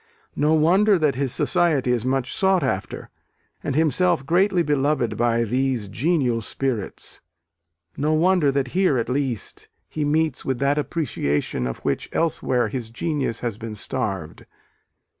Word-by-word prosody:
No 150 +2 +3
wonder 190 +6 +4
that 155 -4 +2
his 135 0 -1
society 145 -3 +1
is 120 -2 0
much 130 0 -1
sought 190 -2 +2
after, - - -3 0.5
and 140 - -2
himself 160 0 +2
greatly 180 +3 +2
beloved 140 -6 0
by 115 +1 +1
these 125 +1 0
congenial 125 - 0
spirits; 120 -2 -4 0.7
no 150 +2 0
wonder 170 -2 +3
that 135 -2 -1
here, 185 -3 +2
at 115 - -2
least, 130 -4 -3 0.2
he 155 - -3
meets 155 +2 +1
with 130 -2 -1
that 140 +3 +1
appreciation 75 - -1
of 60 - -4
which 70 - -1
elsewhere 130 -7 +1
his 115 0 -4
genius 140 -1 -2
has 115 -3 -3
been 115 -2 -6
starved. 100 -8 -3
135 Hz, 140 wpm, -23 LUFS, 120-160 Hz, 0.7 s, wonder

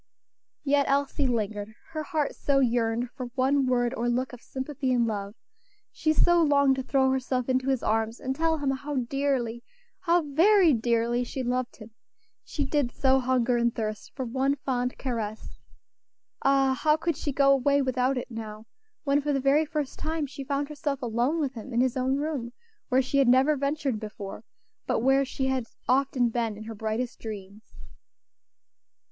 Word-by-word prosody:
Yet 280 0 +2
Elsie 280 0 +1
lingered; 215 -2 -2 0.2
her 310 -1 -3
heart 300 -1 -1
so 280 -1 0
yearned 240 -2 +1
for 255 -3 -6
one 270 +1 +2
word 245 -1 +1
or 240 -1 -1
look 255 +2 -1
of 245 - -10
sympathy 265 0 -3
and 240 -2 +3
love; 205 -2 -4 0.6
she 310 - 0
so 345 +2 +4
longed 280 -3 +4
to - - -1
throw 265 0 +2
herself 255 -1 -1
into 260 0 +1
his 265 -3 0
arms 225 +1 0
and 265 +1 -3
tell 325 +1 +1
him 285 -2 0
how 280 +2 -4
dearly, 250 -2 -1 0.4
how 350 -2 +2
very 335 +4 +5
dearly 235 +1 +1
she 260 +2 -4
loved 250 0 -2
him; 220 0 -13 0.5
she 290 - -3
did 275 -3 0
so 265 -1 +3
hunger 250 -1 +1
and 235 0 +1
thirst 215 -2 -4
for 260 - -3
one 265 +4 0
fond 250 -2 -2
caress 225 -4 -5 0.8
ah! 270 -1 +3
how 305 0 +4
could 335 0 -1
she 290 - -3
go 275 0 +4
away 280 +1 +3
without 260 0 +1
it 250 - -5
now, 220 -1 -7 0.4
when 285 -1 +2
for 295 +1 -1
the 275 - +1
very 280 +4 +3
first 295 -2 -4
time 315 -1 -2
she 275 0 -8
found 280 +1 -1
herself 290 -2 -3
alone 240 +7 0
with 280 -4 -1
him 240 +2 -8
in 235 - +1
his 255 0 +2
own 260 +1 +1
room, 280 -5 -3 0.4
where 260 0 +3
she 275 +2 0
had 270 - +4
never 260 +5 +5
ventured 280 -4 -1
before, 210 -1 -7 0.4
but - - +1
where 270 +2 +4
she 265 0 -3
had 260 -3 -1 0.2
often 255 -1 +2
been 230 -2 -2
in 215 - -8
her 225 +1 -7
brightest 220 +3 -3
dreams. 210 -1 -9
260 Hz, 180 wpm, -27 LUFS, 235-280 Hz, 0.8 s, very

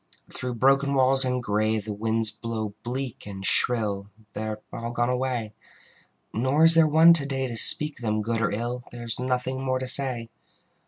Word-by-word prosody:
Through 125 -1 -5
broken 135 +3 +2
walls 135 0 +4
and 125 -1 -1
gray 110 0 0
The 105 0 -5
winds 110 +1 0
blow 110 -1 -5
bleak 125 -2 -6
and 95 -1 -7
shrill: 105 -5 +2 0.2
They 110 - -5
are 110 0 -5
all 115 0 -5
gone 120 +1 -1
away. 125 -4 -3 0.8
Nor 130 +7 +2
is 165 - +8
there 165 -1 +4
one 160 +3 +6
to 155 -4 +1
day 135 -1 -2
To 120 -2 -5
speak 150 +6 +5
them 110 -2 -2
good 115 +1 -2
or 105 - +1
ill: 120 +3 -4
There 120 -1 -10
is 115 - -4
nothing 130 +1 -2
more 130 -1 -1
to 130 - -4
say. 125 -3 -2
120 Hz, 190 wpm, -25 LUFS, 110-130 Hz, 0.8 s, is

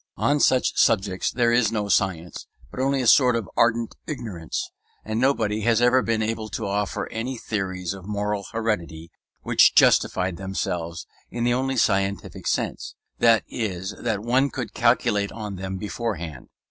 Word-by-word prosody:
On 145 - +2
all - - -3
such 130 -2 +3
subjects 95 -3 +2
there 120 -1 +1
is 120 -2 +3
no 105 -2 -2
science, 90 -3 -1 0.2
but - - -8
only 135 0 +1
a - - -2
sort 125 0 +5
of 115 -5 -2
ardent 115 -1 +2
ignorance; 110 - -5 0.3
and 110 +1 -2
nobody 110 -6 +1
has 115 +1 +2
ever 125 +2 +4
been 110 -1 0
able 110 0 -3
to 110 - -4
offer 100 0 -2
any 120 +3 -4
theories 95 -5 -3
of 95 -1 -11
moral 105 -1 -2
heredity 85 -8 -3 0.3
which - - +4
justified 90 -1 +3
themselves 85 -3 -4 0.2
in 120 - -3
the 120 0 +2
only 130 +1 -1
scientific 100 -4 0
sense; - - -2 0.2
that 115 -1 +5
is 95 -4 -4
that 110 -4 -2
one 130 +4 +2
could - - -5
calculate 100 -1 +2
on 105 -3 -6
them 95 0 -5
beforehand. 95 -5 -5
105 Hz, 160 wpm, -24 LUFS, 95-120 Hz, 0.3 s, sort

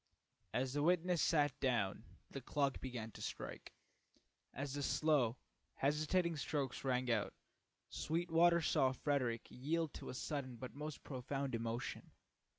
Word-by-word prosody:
As 130 +1 0
the 145 - +1
witness 175 +1 +3
sat 145 -4 +3
down 120 -8 +1 0.3
the 135 - -5
clock 140 +1 0
began 120 -4 -4
to - - -11
strike. - - -5 0.8
As 140 +1 -4
the 145 - -2
slow, 140 -5 +3 0.4
hesitating 155 +4 +2
strokes 140 -2 -2
rang 125 -2 +1
out, 110 -3 0 0.5
Sweetwater 170 +1 +3
saw 130 -3 +3
Frederick 130 -4 0
yield 155 +4 -1
to - - -7
a - - -5
sudden 135 -2 -3
but 125 +2 -7
most 150 +1 -6
profound 135 0 -3
emotion. 115 +1 -3
140 Hz, 135 wpm, -39 LUFS, 125-155 Hz, 0.8 s, witness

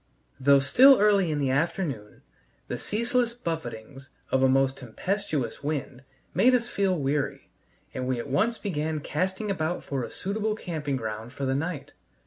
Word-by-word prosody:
Though 140 +1 +6
still 250 - +6
early 200 -4 +4
in 150 - -1
the 140 -2 +1
afternoon, 140 - -2 0.4
the - - -4
ceaseless 235 +2 0
buffetings 135 - -6 0.2
of 130 - +3
a 130 - +5
most 135 0 +2
tempestuous 140 - -3
wind 140 -3 -3 0.3
made 255 +1 +5
us 240 -1 0
feel 195 -5 +1
weary, 140 -1 -2 0.4
and 130 0 -3
we 130 -1 0
at 120 - -4
once 215 - +1
began 155 -5 -2
casting 190 +8 -2
about 175 -2 -2
for 135 -3 -3
a - - -5
suitable 210 +2 -2
camping 155 -9 -3
ground 110 0 -5
for 140 - -4
the 130 - +1
night. 150 +2 -3
150 Hz, 160 wpm, -27 LUFS, 135-200 Hz, 0.4 s, Though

